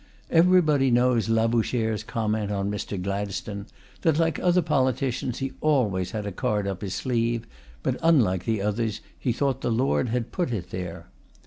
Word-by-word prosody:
Everybody 165 -5 +5
knows 120 -2 +3
Labouchere's 115 -1 +1
comment 110 -3 -1
on 100 0 -1
Mr. 105 -1 -4
Gladstone, 100 +1 -4 0.3
that 160 -2 +2
like 165 -2 +1
other 180 0 +3
politicians 130 -3 0
he 135 0 -3
always 105 -12 +1
had 105 0 -4
a 100 - -3
card 105 +2 -1
up 95 -2 -3
his 100 -3 -3
sleeve, 115 -2 0 0.4
but, - - -1
unlike 115 - +3
the 110 -3 0
others, 105 0 -1 0.2
he 125 - 0
thought 135 +3 0
the - - -1
Lord 125 +1 +1
had 120 0 -2
put 175 -8 -1
it 95 -7 -4
there. 90 -2 -5
115 Hz, 160 wpm, -26 LUFS, 105-130 Hz, 0.4 s, Everybody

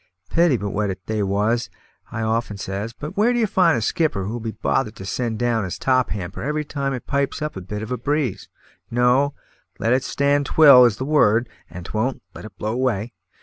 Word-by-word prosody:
Pity 170 -6 +3
but 100 -2 -4
what 100 -2 -1
they 110 -1 -2
was, 105 +4 0 0.4
I 115 0 -3
often 110 -1 -1
says; 100 +3 -4
but 150 +9 -8
where 220 +4 +3
d'ye 240 -2 +2
find 180 - +3
a - - -2
skipper 110 - 0
who'll 115 +4 -4
be 115 0 -4
bothered 110 +1 -1
to 95 - -9
send 115 +2 -2
down 120 -2 0
his 90 - -4
top 130 -1 +1
hamper 95 -2 -5
every 150 +3 -2
time 140 -1 -3
it 125 - -8
pipes 140 -1 -1
up 150 0 -4
a 95 - -6
bit 105 +3 -6
of 110 - -7
a 125 - -1
breeze? 130 -6 -2 0.4
No; 125 +4 +2 0.4
`Let 115 - 0
it 130 +1 +2
stand 140 +1 +1
if - - -6
'twill,' 140 -5 +9
is 110 -4 +2
the 130 - -3
word, 120 -6 +3 0.2
`and 85 +1 -9
if - - -8
'twon't, 120 +5 -2
let - - -10
it 100 -3 -12
blow 105 +4 -2
away.' 120 -3 -1
120 Hz, 220 wpm, -22 LUFS, 105-140 Hz, 0.4 s, twill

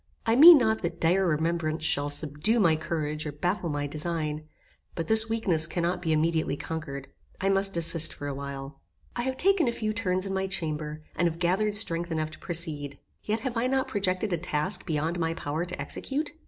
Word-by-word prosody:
I 225 0 +3
mean 325 +5 +10
not 220 -4 +1
that 170 -1 -4
dire 185 +3 +2
remembrance 160 0 -1
shall 145 -2 +1
subdue 150 +9 +1
my 170 -6 +4
courage 155 -1 -3
or - - -3
baffle 175 +4 -2
my 145 -1 -2
design, 155 0 -3 0.5
but 165 - -3
this 220 0 +5
weakness 185 -8 +2
cannot 175 +1 -2
be 165 -2 -1
immediately 160 -1 +1
conquered. 140 -4 -6 0.3
I 195 - 0
must 195 0 +1
desist 165 -1 +3
for 145 - -8
a 145 - -2
little 135 - -6
while. 140 0 -7 0.3
I 240 - -1
have 260 +1 -3
taken 390 -5 +3
a - - +2
few 215 -2 -3
turns 185 -3 -1
in 195 - -3
my 190 0 -1
chamber, 155 -4 -4
and 175 - +2
have 165 -1 -3
gathered 190 +5 0
strength 170 -4 +3
enough 155 -1 -2
to 155 - -13
proceed. 150 -5 -1 0.2
Yet 220 +1 -2
have 260 -3 -4
I 230 +2 +1
not 265 0 0
projected 195 -1 -1
a 170 - -1
task 160 +4 -2
beyond 160 +2 -1
my 165 0 -1
power 155 +2 -3
to 180 - -6
execute? 290 +3 -3
170 Hz, 205 wpm, -27 LUFS, 155-200 Hz, 0.5 s, mean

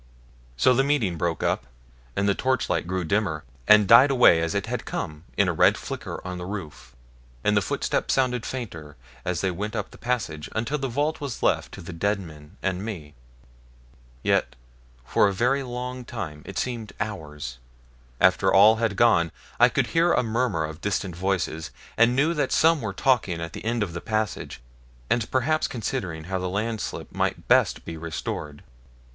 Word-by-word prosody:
So 125 - +5
the 135 +2 +3
meeting 135 -11 +1
broke 85 0 -1
up, - - 0 0.5
and 100 +1 +1
the 100 - +4
torchlight 130 -6 0
grew 95 0 -1
dimmer, 85 -4 0 0.2
and 105 -2 +7
died 115 +6 +8
away 125 -11 +6
as 85 +3 -1
it 100 0 0
had 125 +2 -3
come 75 -2 -5
in 100 - +4
a 90 - +1
red - - +4
flicker - - -6
on 90 -1 -5
the 90 - -5
roof, 95 -7 -7 0.5
and 105 - +3
the 100 - +4
footsteps - - 0
sounded 125 -3 +1
fainter 85 - -6 0.3
as 90 -2 -1
they 95 - +1
went 105 +5 -4
up 105 -3 -3
the - - -15
passage, 110 -12 -2
until 130 +7 -1
the 135 - -1
vault 145 +6 -1
was 140 -5 -5
left - - +1
to - - -8
the 85 - -8
dead 100 +5 0
men 80 -1 -12
and 95 0 -1
me. 85 -9 -6 1.1
Yet - - +1 0.5
for 105 - +3
a 100 - 0
very 125 +8 +2
long 125 0 -5
time 75 -9 -6
it 100 - -7
seemed 115 -4 -3
hours 75 - -5 0.6
after - - +4
all 105 +3 +7
had 110 -2 0
gone 90 -8 +4 0.3
I - - +7
could - - +1
hear 165 +1 +4
a - - +2
murmur 115 -8 0
of 80 +1 -8
distant 100 -3 -2
voices, 85 -4 -1 0.3
and 115 +2 +4
knew 150 +5 +3
that 150 - -1
some 160 -2 +4
were 110 -3 -3
talking 100 -6 +1
at 85 0 -5
the - - -7
end 115 0 0
of 90 -5 -5
the 85 - -5
passage, 110 - -3 0.5
and 115 -2 +1
perhaps 155 +5 +1
considering 100 -9 -4
how 95 +3 -3
the 90 0 -2
landslip 110 +3 -3
might - - -1
best - - +3
be 85 - -6
restored. 80 -2 -5
100 Hz, 185 wpm, -25 LUFS, 85-120 Hz, 1.1 s, died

